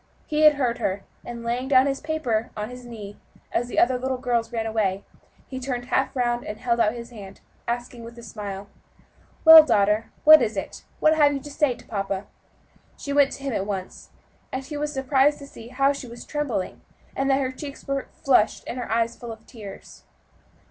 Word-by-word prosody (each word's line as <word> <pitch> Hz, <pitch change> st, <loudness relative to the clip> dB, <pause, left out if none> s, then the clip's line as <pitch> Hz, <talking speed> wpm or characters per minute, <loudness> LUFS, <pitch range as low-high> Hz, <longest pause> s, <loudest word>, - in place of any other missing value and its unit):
He 305 Hz, 0 st, -1 dB
had 305 Hz, -1 st, +8 dB
heard 245 Hz, -4 st, -1 dB
her, 195 Hz, -3 st, -2 dB, 0.2 s
and 235 Hz, -1 st, -7 dB
laying 245 Hz, +3 st, -2 dB
his 275 Hz, 0 st, +3 dB
paper 300 Hz, -8 st, 0 dB
down 230 Hz, -, -17 dB
on 215 Hz, -, -5 dB
his 250 Hz, -1 st, -10 dB
knee, 210 Hz, -4 st, -9 dB, 0.3 s
as 240 Hz, -, 0 dB
the -, -, -7 dB
other 250 Hz, +1 st, +3 dB
little 260 Hz, 0 st, -2 dB
girls 240 Hz, -2 st, -1 dB
ran 225 Hz, -2 st, -2 dB
away, 205 Hz, -3 st, -1 dB, 0.4 s
he 260 Hz, -, -6 dB
turned 245 Hz, -1 st, -4 dB
half 265 Hz, +1 st, +1 dB
round 240 Hz, -1 st, 0 dB
and 210 Hz, -, -6 dB
held 235 Hz, 0 st, 0 dB
out 215 Hz, -1 st, +3 dB
his 235 Hz, 0 st, -8 dB
hand, 200 Hz, -4 st, -11 dB, 0.3 s
asking, 240 Hz, 0 st, -4 dB
with 235 Hz, +1 st, -11 dB
a 235 Hz, -, -10 dB
smile, 200 Hz, -2 st, -7 dB, 0.8 s
"Well, 320 Hz, 0 st, +12 dB
daughter, 215 Hz, -5 st, +2 dB
what 310 Hz, -1 st, +9 dB
is 220 Hz, -3 st, -1 dB
it? 195 Hz, -, -6 dB
what 310 Hz, -, +5 dB
have 290 Hz, -2 st, +4 dB
you 280 Hz, -, -2 dB
to 290 Hz, -, -9 dB
say 285 Hz, -3 st, +1 dB
to -, -, -16 dB
papa?" 195 Hz, -2 st, -3 dB, 0.7 s
She 280 Hz, -, -5 dB
went 285 Hz, -1 st, +4 dB
to 275 Hz, -, -9 dB
him 275 Hz, -3 st, -2 dB
at 195 Hz, -1 st, -2 dB
once, 190 Hz, -3 st, -6 dB, 0.4 s
and 260 Hz, -, -3 dB
he 300 Hz, -, -7 dB
was 295 Hz, 0 st, -2 dB
surprised 270 Hz, +1 st, +2 dB
to 280 Hz, -, -10 dB
see 230 Hz, -4 st, -12 dB
how 275 Hz, +3 st, +2 dB
she 275 Hz, -2 st, -8 dB
was 235 Hz, 0 st, -10 dB
trembling, 260 Hz, -11 st, -3 dB, 0.3 s
and 270 Hz, 0 st, 0 dB
that 270 Hz, 0 st, +3 dB
her 260 Hz, -1 st, -1 dB
cheeks 280 Hz, +2 st, -9 dB
were 275 Hz, -1 st, -2 dB
flushed 250 Hz, -6 st, +2 dB
and 250 Hz, -, -5 dB
her 245 Hz, -, -5 dB
eyes 230 Hz, +1 st, +1 dB
full 240 Hz, -1 st, -8 dB
of 220 Hz, 0 st, -11 dB
tears. 210 Hz, -5 st, -11 dB
245 Hz, 210 wpm, -24 LUFS, 225-275 Hz, 0.8 s, Well